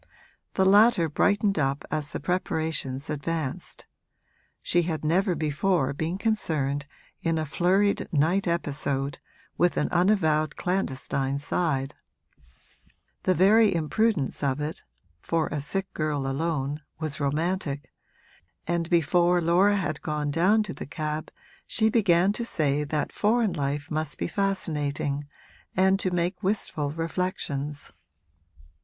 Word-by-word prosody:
The 190 - +3
latter 200 -3 +5
brightened 200 +4 +2
up 140 0 0
as 150 -1 -2
the - - -5
preparations 160 -5 -1
advanced; 150 -1 -4 0.8
she 175 - +3
had 160 -2 -3
never 180 +4 +2
before 155 0 0
been 160 +5 -2
concerned 150 -10 0 0.3
in 165 -1 0
a 155 - -1
flurried 185 +7 +1
night 170 +6 +2
episode, 140 -4 -1 0.4
with 175 0 +3
an - - +1
unavowed 160 -5 +2
clandestine 140 -6 -1
side; 140 -2 -1 1.3
the 185 - +3
very 205 +2 +5
imprudence 170 - 0
of 140 -1 0
it 150 +2 -4 0.4
(for 165 -2 0
a 150 - -3
sick 195 +6 -2
girl 150 -3 -1
alone) 145 0 -2 0.2
was 155 -3 -4
romantic, 150 0 -1 0.7
and 170 0 -1
before 175 +1 +3
Laura 180 +5 +4
had 195 -3 -2
gone 150 -1 -2
down 190 +8 +3
to 200 - -6
the - - -8
cab 155 0 -4 0.4
she 220 -2 +2
began 195 -3 +3
to 235 - -2
say 150 -9 0
that 150 0 -2
foreign 220 -2 +2
life 145 -1 -3
must 155 -1 -2
be - - -2
fascinating 150 -7 -2 0.5
and 190 +1 +4
to 185 - 0
make 180 +2 -1
wistful 185 -7 -1
reflections. 155 -3 -3
165 Hz, 125 wpm, -26 LUFS, 145-185 Hz, 1.3 s, latter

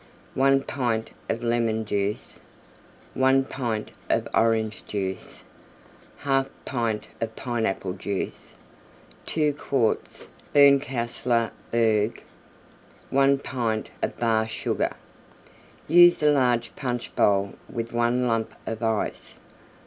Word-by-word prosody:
1 135 +1 +3
pint 120 -6 -2 0.2
of 115 - -2
Lemon 115 -2 +1
Juice. 100 0 -2 0.7
1 135 0 +3
pint 120 -6 -3 0.2
of - - +1
Orange 110 -1 +1
Juice. 95 -2 -4 0.8
1/2 135 -1 +1 0.2
pint 115 -4 -2
of 110 -1 -3
Pineapple 110 -6 -2
Juice. 100 +1 -5 0.7
2 150 -2 +1
quarts 135 -5 -1 0.3
Berncastler 125 -4 +3 0.2
Berg. 110 -1 +1 0.9
1 140 0 +4
pint 115 -5 -2
of - - -2
Bar 110 -2 +1
Sugar. - - -2 0.9
Use 175 0 +7
a 150 - +6
large 125 -4 +1
Punch 125 -3 -4
bowl 100 -1 +2 0.2
with 115 0 -5
one 120 +1 +2
Lump 115 -2 -1
of 110 0 -4
Ice. 110 -2 -2
115 Hz, 105 wpm, -25 LUFS, 110-135 Hz, 0.9 s, Use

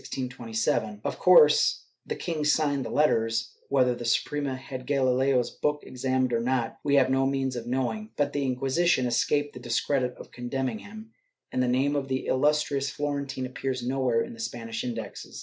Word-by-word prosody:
^ 115 -4 -2
Of - - -3
course 470 -1 +6 0.2
the - - -2
king 160 -4 -3
signed 145 -2 +2
the 115 - -5
letters; 115 -5 +1 0.2
whether 130 -2 +3
the 120 - -7
Suprema 135 +4 0
had 130 -1 -8
Gahleo's 130 -2 +2
book 150 0 -1
examined 130 0 -1
or 115 - +2
not, 120 -1 -1
we 145 -1 +2
have 130 -2 +4
no 135 0 +3
means 135 -1 -1
of 120 -1 -5
knowing, 130 - -2
but 145 -1 0
the 145 - -1
Inqui 130 -1 -2
sition 135 0 +2
escaped 145 +5 +1
the 125 - -9
discredit 125 +1 0
of - - -12
condemning 130 - -3
him, 220 +2 -11 0.4
and 130 - 0
the 125 - +2
name 135 +4 +2
of 140 -2 -1
the 130 0 -2
illustrious 140 0 +1
Florentine 140 -3 -3
appears 130 -1 -3
nowhere 130 -3 +1
in - - -8
the 115 - -13
Spanish 115 0 -4
Indexes. 115 -5 -6
130 Hz, 180 wpm, -27 LUFS, 125-145 Hz, 0.4 s, course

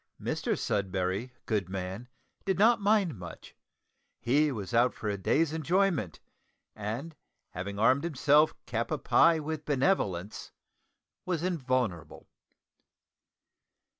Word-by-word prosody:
Mr - - -2
Sudberry, 95 +3 -1 0.2
good 105 -5 -1
man, 95 +5 -5 0.3
did 190 -2 0
not 225 +3 +4
mind 200 - +2
much; 85 -2 -10 0.6
he 145 +5 +2
was 105 -4 -6
out 120 +2 +3
for 110 - -6
a 100 - -1
day's 150 - +1
enjoyment, 160 - 0 0.6
and 115 +10 -5 0.4
having 100 +3 -5
armed 130 +7 +3
himself 150 -1 +3
cap 115 -1 -2
a 155 - -1
pie 165 +2 +4
with 155 0 -4
benevolence, 125 - -1 0.7
was 175 -3 -2
invulnerable. 130 - -2
130 Hz, 110 wpm, -29 LUFS, 100-160 Hz, 0.7 s, not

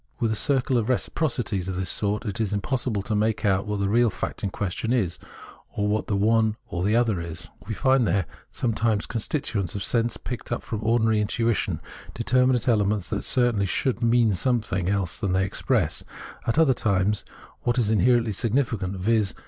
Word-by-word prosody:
With 115 -2 +1
a - - 0
circle 130 +1 +2
of 115 +1 -2
reciprocities 120 - -1
of 95 - -3
this 95 -1 0
sort 105 +2 -1
it 105 +1 -2
is 105 -2 -1
impossible 110 0 -1
to 110 - -3
make 105 +1 0
out 95 0 +2
what 105 -1 -2
the 100 - +1
real 115 +3 +3
fact - - -5
in 100 - 0
question 100 +4 -3
is, 105 -9 0 0.6
or 105 - 0
what 105 +1 0
the 105 - 0
one 110 +1 +3
or 90 -3 -3
the 105 +3 +2
other 115 -7 +2
is. 85 0 -6 0.2
We 110 - -3
find 130 -2 +3
there 95 0 +1 0.3
sometimes 110 -2 0
constituents 110 - -2
of 100 - -2
sense 115 -1 +1
picked 125 - -7
up - - -2
from 110 - -4
ordinary 110 -1 +2
intuition, 115 +1 0 0.3
determinate 125 +1 +2
elements 105 -4 +1
that - - -1
certainly 120 -6 +2
should 125 +5 -1
mean 115 -2 +3
some 120 +6 +1
thing 95 -4 -2
else 100 -4 -1
than 95 -2 -1
they 95 +1 +2
express; 100 - 0 0.4
at 115 - +1
other 160 -5 +5
times 100 -2 +1 0.4
what 120 +1 0
is 110 -4 +2
inherently 115 +2 +3
significant, 110 -3 -1
viz. 100 -1 +1
110 Hz, 190 wpm, -25 LUFS, 100-120 Hz, 0.6 s, other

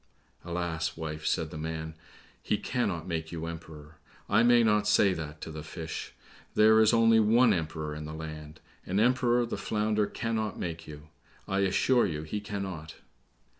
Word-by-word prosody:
"Alas, 85 -2 -3
wife," 80 -1 -4
said 80 -1 0
the 75 - -6
man, 80 0 -4 0.5
"he 105 - 0
cannot 100 -11 -2
make 80 -2 -3
you 80 -1 -4
Emperor; 80 -2 -9 0.3
I 105 +2 +4
may 120 0 +5
not 105 -1 +3
say 100 -2 +4
that 75 -3 -7
to 80 - -6
the 75 0 -6
fish. 80 +1 -6 0.4
There 110 +1 +6
is 110 -1 +6
only 115 -1 +5
one 115 +2 +5
Emperor 80 -3 -3
in 75 0 -6
the 75 +1 -6
land. 75 -1 -8 0.2
An 95 +3 -1
Emperor 120 +1 +3
the 115 - -4
Flounder 105 -1 0
cannot 110 -3 -2
make 85 -1 -5
you! 75 0 -11 0.4
I 95 0 0
assure 100 +6 +3
you 75 -3 -4
he 80 +7 -4
cannot." 95 -7 -5
85 Hz, 170 wpm, -29 LUFS, 80-110 Hz, 0.5 s, There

